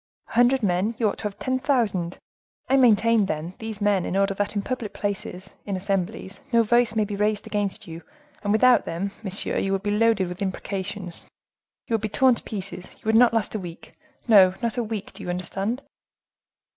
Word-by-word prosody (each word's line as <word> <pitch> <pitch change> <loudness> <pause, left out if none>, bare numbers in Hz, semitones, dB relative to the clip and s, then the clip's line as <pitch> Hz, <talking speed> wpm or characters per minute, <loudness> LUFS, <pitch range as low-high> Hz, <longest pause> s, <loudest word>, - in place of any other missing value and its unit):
A - - -11
hundred 245 +2 +4
men!—you 210 +5 +1
ought 205 - -3
to - - -7
have 200 -1 -3
ten 260 0 -1
thousand. 210 -11 0 0.5
I 270 - +3
maintain, 230 -4 +4
then, 155 +1 -3
these 220 -2 -5
men 205 -3 +2
in 190 - -2
order 195 0 +2
that 205 +2 -2
in 200 - -1
public 245 -4 -4
places, 195 -2 -4
in 200 - -3
assemblies, 195 +1 -3
no 230 -1 +5
voice 235 0 +2
may 215 -1 +2
be 205 0 -4
raised 210 +1 0
against 205 +1 -2
you; 165 -2 -8 0.4
and 205 - -1
without 245 +4 +5
them, 190 +4 -3
monsieur, 195 -2 -1
you 195 - -1
would 195 0 -1
be 205 0 0
loaded 220 -4 +3
with 180 +3 -7
imprecations, 190 -1 -4 0.6
you - - -4
would 225 - +1
be 215 - -2
torn 260 +3 +4
to 235 - -4
pieces, 195 -3 -6
you - - -26
would 220 - +1
not 240 +1 +6
last 225 -2 -1
a 215 - -2
week; 175 -3 -10 0.3
no, 190 -5 +7
not 235 -2 -1
a 240 - 0
week, 215 -2 -5
do - - -11
you - - -6
understand?" 195 +8 -2
205 Hz, 205 wpm, -24 LUFS, 190-230 Hz, 0.6 s, no